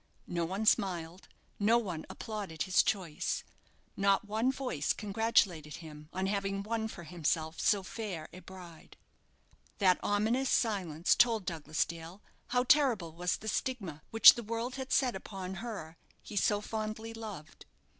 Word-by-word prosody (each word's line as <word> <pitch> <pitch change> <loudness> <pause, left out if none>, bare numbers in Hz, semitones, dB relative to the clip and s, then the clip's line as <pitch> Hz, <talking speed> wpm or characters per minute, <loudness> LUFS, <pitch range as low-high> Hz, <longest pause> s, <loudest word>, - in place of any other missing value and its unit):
No 170 -1 -1
one 195 +6 -3
smiled; 180 -5 +1 0.3
no 220 +3 +4
one 180 -9 -4
applauded 205 -8 -4
his 185 - +4
choice; 185 -8 -1 0.5
not 195 0 +2
one 220 +5 +1
voice 250 - -1
congratulated 200 -7 +1
him 150 -2 -11
on 190 +1 -2
having 195 0 -1
won 220 +1 -2
for 190 -5 -9
himself 160 0 -2
so 200 -2 +3
fair 185 -6 -5
a 185 - -9
bride. 180 -4 -13 0.8
That 185 -3 +4
ominous 225 +6 +1
silence 180 -8 +1
told 225 -5 +3
Douglas 155 -3 -1
Dale 170 +4 -9 0.2
how 250 0 +2
terrible 250 - +3
was 175 +1 -1
the 220 - -10
stigma 205 - -2
which 225 - +10
the 240 - -5
world 230 +3 -3
had 265 0 -6
set 250 -5 +3
upon 190 -1 -6
her 200 -9 -6 0.3
he 210 - -9
so 205 +1 +2
fondly 220 +1 -4
loved. 215 -9 -9
195 Hz, 145 wpm, -32 LUFS, 170-225 Hz, 0.8 s, which